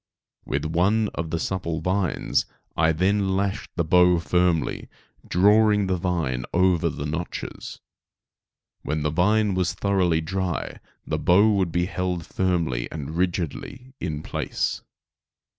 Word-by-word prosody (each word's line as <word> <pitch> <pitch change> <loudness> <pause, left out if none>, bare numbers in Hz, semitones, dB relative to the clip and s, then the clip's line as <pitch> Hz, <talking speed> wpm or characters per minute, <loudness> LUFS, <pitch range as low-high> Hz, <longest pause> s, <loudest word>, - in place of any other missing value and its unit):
With 70 +3 -2
one 100 +7 +2
of 80 -1 -4
the 85 - -1
supple 85 -2 -2
vines 90 0 0 0.3
I 80 0 +3
then 95 +4 +1
lashed 100 +1 -2
the 85 - +1
bow 90 +2 +5
firmly, 90 -2 0 0.4
drawing 105 +2 +4
the 95 -1 0
vine 85 -9 -1
over 90 -2 +3
the 70 -1 -5
notches. 80 +3 -5 1.0
When 75 +1 -2
the 75 - 0
vine 105 +5 +2
was 90 -2 0
thoroughly 95 -5 +1
dry 90 +2 -3 0.3
the - - -2
bow 100 +5 +5
would 95 -4 +1
be 90 +1 +1
held 90 -2 -3
firmly 85 -10 -1
and 75 0 -6
rigidly 90 - -3
in 80 -3 -4
place. - - -2
90 Hz, 130 wpm, -24 LUFS, 80-95 Hz, 1.0 s, bow